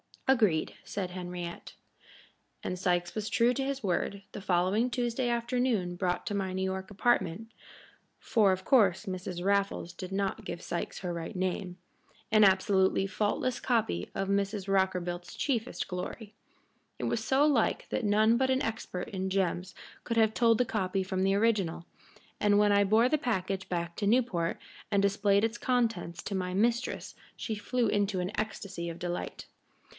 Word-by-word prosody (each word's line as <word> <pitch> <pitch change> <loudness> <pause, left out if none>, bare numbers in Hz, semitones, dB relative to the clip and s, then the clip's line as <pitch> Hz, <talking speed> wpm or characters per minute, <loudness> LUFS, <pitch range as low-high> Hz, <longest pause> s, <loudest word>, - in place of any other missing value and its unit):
"Agreed," 215 -12 +3
said 185 -3 -4
Henriette. 180 -1 -6 0.9
And 180 0 -3
Sikes 175 -1 0
was 215 0 -3
true 240 +1 +3
to 270 - -1
his 275 -1 -3
word. 200 +1 -1
The 205 - -7
following 190 +6 +2
Tuesday 245 0 -1
afternoon 235 -6 0
brought 180 -1 -1
to - - -1
my 190 -2 -1
New 190 0 -1
York 190 0 -3
apartment 210 -1 0 0.7
for 205 -4 +3
of 185 0 -4
course 205 -7 +4
Mrs. 180 -2 -4
Raffles 200 -3 0
did 185 0 -7
not 200 +2 -2
give 170 -1 -5
Sikes 170 - -4
her 180 -2 -3
right 165 +1 -5
name 185 0 -2 0.5
an 215 -1 +7
absolutely 190 0 +3
faultless 210 +6 -1
copy 220 - 0
of 195 - -2
Mrs. 200 0 0
Rockerbilt's 180 -2 0
chiefest 235 -6 -1
glory. 200 +4 -5 0.6
It - - -6
was 220 - 0
so 265 +5 +3
like 275 -7 +1
that 240 - -1
none 215 +3 +4
but 260 +1 +1
an 260 +1 +2
expert 220 -6 -4
in 190 -1 -3
gems 185 -2 -1 0.3
could 230 - -2
have 220 -1 +4
told 230 -1 +4
the 250 - +2
copy 195 -4 -1
from 185 0 -1
the 195 0 +3
original, 200 -6 +1 0.5
and 205 -1 +4
when 205 0 +4
I 200 0 +4
bore 220 +5 +4
the 305 - +3
package 195 -8 -2
back 170 -1 -3
to 205 - 0
Newport 210 -8 +1 0.3
and 200 -2 +2
displayed 200 0 +3
its 225 +1 0
contents 225 -10 0
to 200 - -4
my 180 -1 -2
mistress 235 +5 0 0.2
she 225 - -4
flew 230 +3 0
into 200 -2 +1
an 180 +2 -2
ecstasy 200 -5 -4
of 165 - -6
delight. 175 0 -4
200 Hz, 165 wpm, -30 LUFS, 185-225 Hz, 0.9 s, an